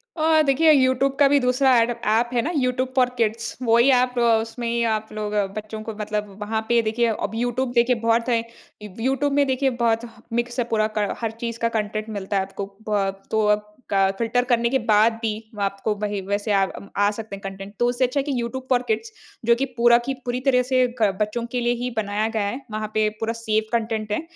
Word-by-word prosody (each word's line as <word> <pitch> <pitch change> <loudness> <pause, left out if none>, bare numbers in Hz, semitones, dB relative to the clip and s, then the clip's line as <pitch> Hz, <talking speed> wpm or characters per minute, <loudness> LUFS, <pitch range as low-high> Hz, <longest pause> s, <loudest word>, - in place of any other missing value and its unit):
अ, 315 0 +4
देखिए 310 +4 +4
यूट्यूब 265 0 +3
का 285 - +7
भी 285 0 +4
दूसरा 255 +1 +3
एडप 235 0 0
ऐप 235 +2 +2
है 240 - +2
ना 315 +8 -2
यूट्यूब 255 0 0
फ़ॉर 250 -1 +4
किड्स। 225 0 -1
वही 235 +2 +4
एप 250 -1 +2
अ, - - +2 0.2
उसमें 230 +1 -5
ही 235 0 0
आप 215 0 -3
लोग 210 -1 -4 0.2
बच्चों 215 +1 -6
को 220 0 -5
मतलब 210 -1 -3
वहाँ 220 +1 -1
पे 235 -1 +4
देखिए 225 +2 +1 0.2
अब 200 - -13
यूट्यूब 245 +2 -1
देखिए 240 +1 +3
बहुत 230 +2 +2
है। 230 -1 +2 0.4
यूट्यूब 265 +8 -1
में 285 0 +3
देखिए 265 +1 +1
बहुत 230 0 +2
ह 230 - -15
मिक्सअप 240 0 -1
पूरा 215 -1 +2
क 205 -1 0
हर 225 -1 -1
चीज़ 230 0 -5
का 230 - +1
कंटेंट 215 +1 -3
मिलता 200 -1 -4
है - - +2
आपको। 195 +1 -6 0.2
ब 200 -2 +1 0.2
तो 220 -1 +2
अब 210 0 +2 0.3
क 195 0 +3
फिल्टर 240 +2 +1
करने 235 -1 +2
के 265 +1 +1
बाद 215 +2 +5
भी 225 -2 0 0.3
आपको 200 +2 -1
वही 205 -1 -1
वैसे 205 +2 -2
अ, 195 -1 +3 0.3
आ 205 0 +4
सकते 215 -1 -7
हैं 195 - -12
कंटेंट। 195 +1 -7
तो 240 - +3
उससे 245 +1 +1
अच्छा 255 +3 -1
है 270 - 0
कि 275 -4 -2
यूट्यूब 260 +2 -5
फ़ॉर 250 -1 +3
किड्स 445 0 -1 0.3
जो 235 - +5
कि 270 +3 -1
पूरा 235 0 +6
की - - +1
पूरी 245 0 -1
तरह 250 -1 +4
से 255 0 +5 0.2
क 205 - +4
बच्चों 230 +3 -1
के 250 - -1
लिए 240 0 +2
ही 250 - -1
बनाया 210 0 0
गया 220 -2 -1
है। 250 +7 -4
वहाँ 215 0 -3
पे 215 0 +2
पूरा 225 0 -1
सेफ़ 215 0 +1
कंटेंट 220 -2 -4
है। 210 - 0
230 Hz, 225 wpm, -23 LUFS, 215-250 Hz, 0.4 s, का